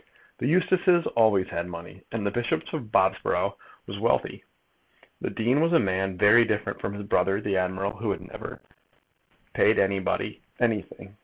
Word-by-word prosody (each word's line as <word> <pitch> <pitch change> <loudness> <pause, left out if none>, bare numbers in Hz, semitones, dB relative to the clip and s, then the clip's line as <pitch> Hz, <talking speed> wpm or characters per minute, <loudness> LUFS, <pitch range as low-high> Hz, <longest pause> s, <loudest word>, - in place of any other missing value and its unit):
The - - -1
Eustaces 180 0 +3
always 110 -5 +3
had 85 +1 -3
money, 90 +2 -9
and 115 -3 -3
the 100 - 0
Bishop 120 +3 -1
of 125 -9 -5
Bobsborough 95 -3 +1 0.3
was - - -6
wealthy. - - 0 0.8
The - - -2
dean 125 +6 +1
was 165 +1 +2
a 165 - +6
man 95 -1 -1
very 105 +5 +6
different 105 -2 -2
from 100 - -3
his 105 - -6
brother 95 0 +1
the 100 -2 -1
admiral, 95 +2 -1
who 110 0 -3
had 100 - -2
never - - -9 0.9
paid - - +4
anybody 95 -1 0 0.2
anything. 105 -3 -2
100 Hz, 160 wpm, -26 LUFS, 95-120 Hz, 0.9 s, a